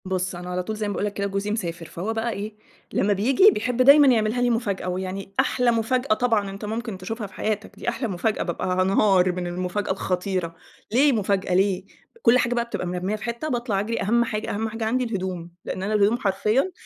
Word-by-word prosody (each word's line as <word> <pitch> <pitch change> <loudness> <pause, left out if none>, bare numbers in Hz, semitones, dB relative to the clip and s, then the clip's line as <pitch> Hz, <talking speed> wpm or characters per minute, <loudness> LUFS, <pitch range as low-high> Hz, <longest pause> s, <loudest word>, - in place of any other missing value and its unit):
بُصّ 185 -1 -2
أنا 180 +1 -7
على 180 0 -2
طول 215 +4 -4
زي 215 0 -2
ما - - -2
باقول 200 - -1
لك 205 - -3
كده 200 0 -2
جوزي 200 +1 -2
مسافر، 175 -6 -3
فهو 190 +7 -4
بقى 225 +1 -1
إيه 210 0 -5 0.4
لمّا 205 +1 +2
بييجي 260 - +5
بيحب 250 - -1
دايمًا 280 +2 +8
يعملها 230 -1 +2
لي 245 - +3
مفاجأة، 205 -6 -1
ويعني 190 +2 -4
أحلى 250 -1 +3
مفاجأة 235 +2 +1
طبعًا 215 -3 +1
أنت 195 +2 -7
ممكن 220 -1 -4
تشوفها 210 +4 -5
في 190 - -19
حياتك، 215 +2 -3
دي - - -3
أحلى 240 - -2
مفاجأة 205 +2 -1
بابقى 175 0 -3
هانهار 185 0 +3
من 180 0 -4
المفاجأة 180 +3 -2
الخطيرة، 185 -2 -2 0.4
ليه 275 +6 +5
مفاجأة، 200 -4 0
ليه؟ 190 0 +2 0.4
كُلّ 245 - +5
حاجة 245 -1 +1
بقى 235 -1 0
بتبقى 235 -6 -4
مرمّية 180 +3 -2
في 215 - -8
حتة، 235 +6 -3
باطلع 235 -6 -1
أجري، 225 +3 -2
أهم 235 +4 +3
حاجة 215 -1 -3
أهم 220 +2 -2
حاجة 225 0 -4
عندي 250 +3 +1
الهدوم، 185 -6 -4
لأن 185 - -4
أنا 210 +2 -1
الهدوم 210 +2 +3
حرفيًا 215 - +1
210 Hz, 215 wpm, -24 LUFS, 185-230 Hz, 0.4 s, دايمًا